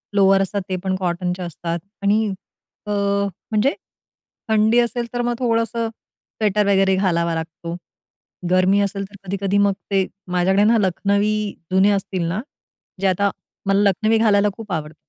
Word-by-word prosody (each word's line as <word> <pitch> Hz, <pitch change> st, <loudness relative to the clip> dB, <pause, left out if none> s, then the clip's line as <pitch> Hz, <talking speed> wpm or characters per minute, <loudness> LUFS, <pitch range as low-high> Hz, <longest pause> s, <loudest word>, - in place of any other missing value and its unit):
Lower 195 Hz, -1 st, +5 dB
असतात 200 Hz, +1 st, -1 dB
ते 185 Hz, -, 0 dB
पण 190 Hz, -1 st, 0 dB
कॉटनचे 180 Hz, 0 st, -2 dB
असतात 170 Hz, 0 st, -4 dB, 0.2 s
आणि 210 Hz, +2 st, +3 dB, 0.6 s
अ, -, -, -2 dB, 0.6 s
म्हणजे 220 Hz, +6 st, +2 dB, 0.8 s
थंडी 220 Hz, +2 st, +4 dB
असेल, 235 Hz, 0 st, 0 dB
तर 245 Hz, -, 0 dB
मग 240 Hz, 0 st, 0 dB
थोडंसं 230 Hz, -1 st, 0 dB
स्वेटर 210 Hz, -2 st, -3 dB
वगैरे 195 Hz, -1 st, +3 dB
घालावा 170 Hz, -3 st, +1 dB
लागतो. 165 Hz, +1 st, -5 dB, 0.7 s
गरमी 185 Hz, +2 st, +4 dB
असेल 200 Hz, 0 st, -1 dB
तर 205 Hz, -, -15 dB
कधी-कधी 195 Hz, +1 st, -1 dB
मग 200 Hz, -1 st, +4 dB, 0.2 s
ते 190 Hz, -1 st, +3 dB, 0.3 s
माझ्याकडे 190 Hz, +3 st, +3 dB
ना 225 Hz, +2 st, +4 dB
लखनवी 200 Hz, +3 st, +1 dB, 0.4 s
जुने 190 Hz, +2 st, +4 dB
असतील 195 Hz, -3 st, -1 dB
ना. 185 Hz, +6 st, -2 dB, 0.6 s
जे 195 Hz, -, +3 dB
आता 200 Hz, +2 st, +2 dB, 0.4 s
मला 200 Hz, +1 st, +4 dB
लखनवी 220 Hz, +3 st, +2 dB
घालायला 210 Hz, -2 st, +4 dB
खूप 225 Hz, -3 st, -9 dB
आवडतात. 155 Hz, -2 st, -3 dB
200 Hz, 145 wpm, -21 LUFS, 185-215 Hz, 0.8 s, Lower